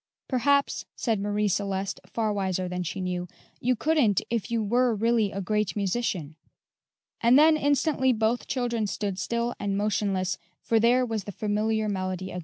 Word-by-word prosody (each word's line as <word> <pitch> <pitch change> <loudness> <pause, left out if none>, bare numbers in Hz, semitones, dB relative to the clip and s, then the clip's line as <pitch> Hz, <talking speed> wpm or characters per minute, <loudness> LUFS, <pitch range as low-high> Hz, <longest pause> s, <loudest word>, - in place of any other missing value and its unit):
"Perhaps," 280 +2 +1
said 225 -4 0
Marie 205 +1 0
Celeste, 195 0 -1
far 220 -2 -1
wiser 190 -2 -1
than 180 0 -3
she 180 +2 -4
knew, 180 -1 -3 0.3
"you 250 +1 +1
couldn't 270 - +2
if 235 -1 -1
you 230 -2 0
were 240 +2 +2
really 225 -1 +2
a 195 - -4
great 210 +1 -1
musician." 195 -6 -1 0.9
And 240 +2 +6
then 310 +2 +6
instantly 285 -2 +2
both 225 +1 0
children 240 -4 -1
stood 200 -1 -3
still 235 +5 -1
and 200 -1 -1
motionless, 200 -3 0 0.2
for 225 - +2
there 245 +3 +4
was 220 -5 -3
the 205 - -5
familiar 215 +2 0
melody 185 -2 -3
again. 180 - -4
215 Hz, 165 wpm, -27 LUFS, 195-240 Hz, 0.9 s, And